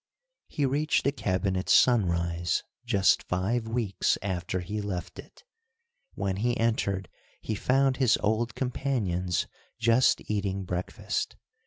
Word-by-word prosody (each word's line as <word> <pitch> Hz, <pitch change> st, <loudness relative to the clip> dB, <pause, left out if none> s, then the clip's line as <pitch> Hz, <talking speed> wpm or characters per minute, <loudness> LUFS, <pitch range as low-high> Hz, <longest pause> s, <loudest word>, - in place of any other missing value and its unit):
He 145 Hz, -, -1 dB
reached 145 Hz, +3 st, +1 dB
the 140 Hz, -, +2 dB
cabin 95 Hz, -7 st, -1 dB
at 95 Hz, -, -3 dB
sunrise, 85 Hz, -7 st, +3 dB, 0.2 s
just 100 Hz, -5 st, +4 dB
five 110 Hz, +6 st, -1 dB
weeks 110 Hz, -4 st, 0 dB
after 90 Hz, -1 st, -2 dB
he 105 Hz, +4 st, -4 dB
left 95 Hz, -4 st, -5 dB
it. -, -, -13 dB, 0.7 s
When 95 Hz, -1 st, -2 dB
he 120 Hz, +4 st, 0 dB
entered 100 Hz, -5 st, 0 dB, 0.3 s
he 110 Hz, -, -4 dB
found 130 Hz, +5 st, +2 dB
his 125 Hz, -4 st, +4 dB
old 110 Hz, +2 st, 0 dB
companions 105 Hz, -, -1 dB, 0.3 s
just 115 Hz, +2 st, +3 dB
eating 100 Hz, -2 st, -1 dB
breakfast. 90 Hz, 0 st, -3 dB
105 Hz, 125 wpm, -28 LUFS, 95-120 Hz, 0.7 s, just